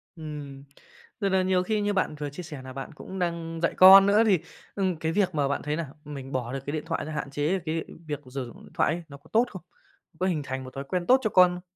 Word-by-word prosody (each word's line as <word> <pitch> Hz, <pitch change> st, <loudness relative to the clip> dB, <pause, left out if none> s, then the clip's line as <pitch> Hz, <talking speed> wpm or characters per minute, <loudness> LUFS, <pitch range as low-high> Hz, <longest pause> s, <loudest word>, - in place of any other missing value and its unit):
Ừm, 145 Hz, -4 st, -8 dB, 0.6 s
tức 200 Hz, -3 st, +1 dB
nà 190 Hz, -1 st, +3 dB
nhiều 185 Hz, -1 st, +2 dB
khi 215 Hz, +2 st, 0 dB
như 205 Hz, 0 st, 0 dB
bạn 185 Hz, -5 st, 0 dB
vừa 145 Hz, -1 st, -4 dB
chia 160 Hz, +6 st, -8 dB
sẻ 150 Hz, -4 st, -8 dB
nà 130 Hz, 0 st, -9 dB
bạn 135 Hz, +3 st, -7 dB
cũng 190 Hz, +5 st, -8 dB
đang 170 Hz, -2 st, -2 dB
dạy -, -, +2 dB
con 195 Hz, +1 st, +10 dB
nữa, 205 Hz, +3 st, +5 dB
thì, 195 Hz, -6 st, +4 dB, 0.4 s
ừm, 190 Hz, -3 st, 0 dB
cái 160 Hz, 0 st, -1 dB
việc 185 Hz, -2 st, +1 dB
mà 145 Hz, -2 st, +2 dB
bạn 140 Hz, -, -1 dB
thấy 150 Hz, +1 st, -1 dB
là 165 Hz, -5 st, -4 dB, 0.2 s
mình 140 Hz, -2 st, -7 dB
bỏ 125 Hz, -1 st, -3 dB
được 135 Hz, -, -2 dB
cái 145 Hz, -, -3 dB
điện 155 Hz, -1 st, -2 dB
thoại -, -, -2 dB
ra, 155 Hz, -, -6 dB
hạn 150 Hz, -2 st, -4 dB
chế 150 Hz, +7 st, 0 dB
cái 165 Hz, -1 st, -3 dB, 0.2 s
việc 150 Hz, -2 st, -3 dB
sử 135 Hz, -2 st, -3 dB
dụng 120 Hz, -, -13 dB
điện -, -, -16 dB
thoại 155 Hz, -, +2 dB
ấy, 170 Hz, +1 st, -5 dB
nó 140 Hz, -, -10 dB
có 155 Hz, +3 st, -22 dB
tốt 230 Hz, +3 st, +5 dB
không? 185 Hz, -, -8 dB, 0.6 s
Có 185 Hz, -, +1 dB
hình 165 Hz, -5 st, 0 dB
thành 130 Hz, -1 st, -4 dB
một 130 Hz, -, -10 dB
thói 135 Hz, -, -4 dB
quen 180 Hz, +5 st, -2 dB
tốt 260 Hz, +1 st, +6 dB
cho 215 Hz, -, +2 dB
con 180 Hz, -2 st, +6 dB
không? 180 Hz, -, -8 dB
160 Hz, 280 wpm, -27 LUFS, 140-185 Hz, 0.6 s, con